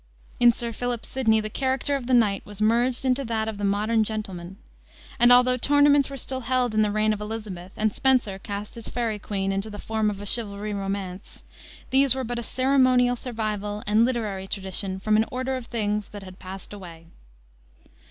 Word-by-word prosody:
In 240 -1 +7
Sir 235 0 -4
Philip 245 -1 -3
Sidney 225 -4 +2
the 215 - -4
character 265 +3 0
of 260 -3 -4
the 255 - +4
knight 205 -5 +2
was 205 -1 -11
merged 240 +4 +2
into 260 +1 +2
that 220 -1 -1
of 215 -2 -5
the - - -4
modern 210 +3 +2
gentleman. 195 -4 -5 0.6
And 240 +1 +6
although 250 +1 +6
tournaments 285 +1 +4
were 275 - -6
still 260 +1 -3
held 250 -1 0
in 215 - +3
the 210 - +2
reign 215 +1 +2
of 210 - -6
Elizabeth, 210 -4 -6
and 215 -1 +1
Spenser 245 -8 +2
cast 205 +1 -6
his 230 - -7
Faery 230 -3 -2
Queene 195 -1 -2
into 195 +2 -2
the 205 - -8
form 220 0 -1
of 200 -2 -5
a 205 - -7
chivalry 205 -1 -1
romance, 195 -1 -5 0.5
these 265 -1 +4
were 265 - -2
but 240 0 -3
a - - -3
ceremonial 255 -1 +3
survival 215 -4 -4
and 210 +2 +4
literary 215 -6 -1
tradition 190 0 -3
from 215 +2 +2
an 220 - +3
order 260 +1 -2
of 250 -3 -6
things 210 -2 -2
that 205 -1 -10
had 185 0 -12
passed 190 +1 -8
away. 170 -5 -10
220 Hz, 195 wpm, -25 LUFS, 205-245 Hz, 0.6 s, In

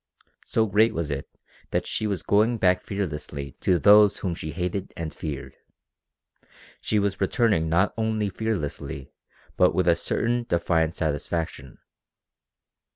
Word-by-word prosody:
So 110 - +2
great 110 +2 +3
was 80 -2 -2
it 70 -1 -4 0.4
that - - -1
she 110 - -2
was 100 -5 -2
going 110 +4 +3
back 90 -3 +3
fearlessly 75 -8 -4
to 90 - +3
those 105 +2 +6
whom 90 -3 -2
she 80 -2 -6
hated 90 +3 -4
and 80 -2 -4
feared. 75 -4 -6 1.3
She 110 - 0
was 100 -1 0
returning 95 -5 +2
not 90 +5 +2
only 110 -2 0
fearlessly 90 -10 -4 0.4
but 90 - +4
with 90 -2 +1
a 85 - +5
certain 120 +7 -1
defiant 85 -1 +1
satisfaction. 75 -2 -3
90 Hz, 135 wpm, -25 LUFS, 80-105 Hz, 1.3 s, those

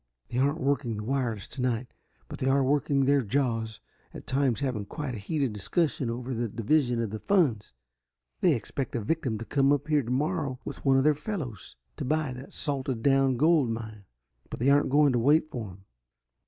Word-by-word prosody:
"They 120 - -2
aren't 140 +4 +1
working 135 -6 0
the 105 - -5
wireless 120 -4 -2
tonight, 125 -2 -2 0.3
but - - -8
they 130 - -1
are 135 0 +3
working 140 0 +2
their 140 +1 +4
jaws, 115 -2 -1 0.4
at - - -9
times 130 -1 0
having 120 -7 -2
quite 150 -1 -4
a 110 - -5
heated 135 +2 -1
discussion 130 - 0
over 125 +2 -4
the 120 0 -1
division 120 +3 +1
of 110 - -4
the 110 - -5
funds. 135 - +1 0.6
They 175 -5 +4
expect 130 +4 -4
a 120 - -1
victim 130 -1 -1
to 115 - -7
come 140 +1 +2
up 145 +1 0
here 150 -1 +3
tomorrow 140 +3 -1
with - - -7
one 135 -1 +4
of 135 - +3
their 150 +1 +5
fellows, 140 - -6 0.2
to 145 - -4
buy 150 -1 0
that 125 +2 -10
salted 130 -4 -2
down 135 -2 +3
gold 155 -2 +4
mine, 110 -3 -6 0.4
but - - -7
they 130 +4 +3
aren't 145 +1 +3
going 145 0 +4
to 120 - +2
wait 150 +5 +3
for 115 -4 -4
him. 95 +1 -15
130 Hz, 195 wpm, -28 LUFS, 115-145 Hz, 0.6 s, their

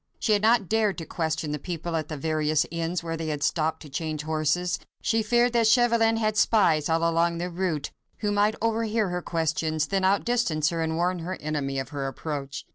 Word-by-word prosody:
She 215 - +1
had 205 - +2
not 220 -2 +3
dared 215 -1 +1
to 165 - -5
question 160 -2 -2
the 150 - -3
people 170 +2 -4
at 155 -2 -2
the 155 - -5
various 155 +1 +1
inns, 170 +1 -2
where 165 -1 -3
they 160 0 -4
had 150 -2 -2
stopped 160 -1 0
to - - -10
change 155 +1 -3
horses. 160 +3 0 0.2
She 225 0 +2
feared 240 +3 +2
that 230 -2 +3
Chauvelin 230 -1 +4
had 215 -1 0
spies 165 -11 +3
all 165 +1 +2
along 170 0 +1
the 175 +1 -3
route, 170 -5 -2 0.3
who 210 -1 -1
might 205 +1 +2
overhear 225 -2 +1
her 180 0 -2
questions, 160 -2 -1
then 195 +3 -1
outdistance 190 -6 +2
her 165 -1 -2
and 160 0 -1
warn 175 +2 0
her 180 +3 -4
enemy 145 -3 -2
of 135 +1 -3
her 140 -3 -3
approach. 140 0 -5
165 Hz, 205 wpm, -26 LUFS, 155-205 Hz, 0.3 s, Chauvelin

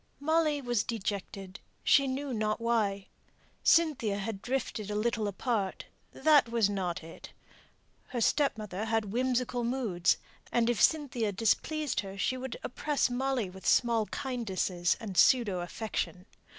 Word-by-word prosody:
Molly 305 0 +2
was 240 -3 +1
dejected, 195 -3 -5 0.2
she 275 -1 +5
knew 265 +1 -3
not 215 -1 -1
why. 215 -4 0 0.6
Cynthia 275 -11 +3
had 200 0 -4
drifted 245 -4 -3
a 210 - -2
little 215 0 0
apart; 205 -1 -2 0.3
that 295 -6 +4
was 230 -3 +2
not 180 -4 -2
it. 165 - -11 0.7
Her 250 - -4
stepmother 220 - 0
had 220 -2 -1
whimsical 250 0 0
moods; 230 -8 +1 0.3
and 240 0 +3
if 235 - -2
Cynthia 255 -9 +2
displeased 290 +9 0
her, 195 -1 -5
she 230 +6 0
would 255 -2 -5
oppress 285 +1 0
Molly 260 -3 0
with 190 +1 -9
small 230 -3 +3
kindnesses 190 -9 -1
and 205 -4 -6
pseudo 205 +1 +4
affection. 180 0 -4
230 Hz, 135 wpm, -30 LUFS, 200-255 Hz, 0.7 s, she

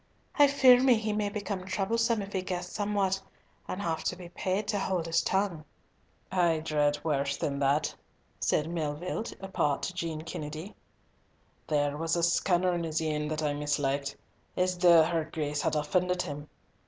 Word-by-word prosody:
"I 290 - +9
fear 260 -3 +6
me 260 -2 +6
he 215 -1 -2
may 210 -1 0
become 200 -2 -4
troublesome 225 +4 0
if 195 - -9
he 190 - 0
guess 180 -1 -4
somewhat, 200 -2 0 0.5
and 185 - -4
have 160 -1 -1
to - - 0
be 180 -1 -10
paid 190 +3 -2
to 205 - +1
hold 185 -4 -1
his 165 0 +2
tongue." 190 -5 0 0.7
"I 175 -3 +3
dread 150 -2 +1
worse 140 -2 0
than 140 -1 -2
that," 145 +2 +1 0.5
said 150 - +1
Melville, 170 +5 -3 0.2
apart 170 -7 -1
to 185 - -2
Jean 165 -3 -4
Kennedy; 155 +3 -6 0.9
"there 145 -1 +1
was 165 +1 0
a 170 - 0
scunner 175 +1 +2
in 170 -1 -1
his 160 -1 -1
een 150 -1 -1
that 155 0 -2
I 150 -1 +1
mislikit, 145 -1 -1 0.4
as 180 0 +2
though 170 -2 +7
her 165 0 0
Grace 150 -2 -3
had - - 0
offended 180 +4 +1
him. 145 +1 -7
170 Hz, 170 wpm, -29 LUFS, 150-190 Hz, 0.9 s, I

